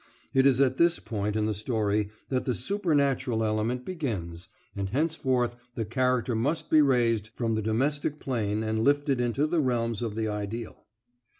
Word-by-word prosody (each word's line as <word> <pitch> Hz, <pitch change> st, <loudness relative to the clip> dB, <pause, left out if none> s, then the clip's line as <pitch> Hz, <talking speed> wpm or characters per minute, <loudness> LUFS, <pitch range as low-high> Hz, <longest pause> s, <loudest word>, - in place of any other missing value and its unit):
It 135 Hz, 0 st, +5 dB
is 135 Hz, -2 st, +3 dB
at 130 Hz, -1 st, +3 dB
this 170 Hz, 0 st, +4 dB
point 105 Hz, -2 st, -3 dB
in 110 Hz, -1 st, +1 dB
the 110 Hz, -, 0 dB
story 105 Hz, -1 st, 0 dB, 0.2 s
that 130 Hz, -1 st, -1 dB
the 125 Hz, -, 0 dB
supernatural 140 Hz, -, 0 dB
element 110 Hz, +3 st, -1 dB
begins, 95 Hz, -, -4 dB, 0.3 s
and 100 Hz, -1 st, -2 dB
henceforth 130 Hz, -3 st, 0 dB, 0.2 s
the 115 Hz, -, -2 dB
character 125 Hz, +2 st, +1 dB
must 135 Hz, +9 st, -1 dB
be 155 Hz, -, +7 dB
raised 120 Hz, -6 st, +2 dB
from 115 Hz, -2 st, -1 dB
the 110 Hz, -, 0 dB
domestic 140 Hz, +7 st, 0 dB
plane 110 Hz, -4 st, -1 dB
and 110 Hz, 0 st, 0 dB
lifted 140 Hz, -2 st, +2 dB
into 120 Hz, +4 st, +1 dB
the 160 Hz, +1 st, +1 dB
realms 115 Hz, -4 st, 0 dB
of 115 Hz, -3 st, -3 dB
the 110 Hz, 0 st, -1 dB
ideal. 105 Hz, +2 st, -5 dB
120 Hz, 170 wpm, -28 LUFS, 110-135 Hz, 0.3 s, be